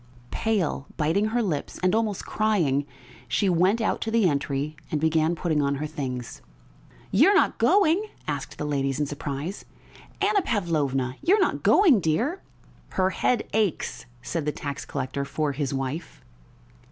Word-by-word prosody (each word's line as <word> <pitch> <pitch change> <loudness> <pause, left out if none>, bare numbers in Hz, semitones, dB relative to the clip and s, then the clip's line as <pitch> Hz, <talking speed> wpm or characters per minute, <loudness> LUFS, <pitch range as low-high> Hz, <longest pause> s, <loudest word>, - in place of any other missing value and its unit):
Pale, 195 -11 -1
biting 165 +7 +2
her 235 +2 0
lips, 160 -8 -3
and 185 +1 +3
almost 220 -3 0
crying, 165 -11 +1 0.4
she 125 - +1
went 185 +5 +3
out 225 - 0
to 225 - -2
the 225 -3 +3
entry 145 0 -1
and 155 - -1
began 160 +1 +2
putting 160 -2 0
on 140 0 +1
her 145 +2 -3
things. 130 -5 -5 0.7
"You - - +6
are 405 - +4
not 385 - +3
going?" 395 0 +4 0.2
asked - - -4
the 150 - -3
ladies 135 -2 -1
in 150 - +1
surprise. 145 +5 -5 0.6
"Anna 405 0 +3
Pavlovna, 145 - -1
you 375 - +4
are - - +1
not 380 - +1
going, 325 - +5
dear?" 225 - 0 0.5
"Her 190 0 +1
head 245 +4 +1
aches," 210 -11 -1 0.2
said 160 +3 -3
the - - +2
tax 145 -1 -5
collector 135 0 -3
for 150 +1 -1
his 140 -1 -2
wife. 135 +4 -4
160 Hz, 160 wpm, -25 LUFS, 140-215 Hz, 0.7 s, You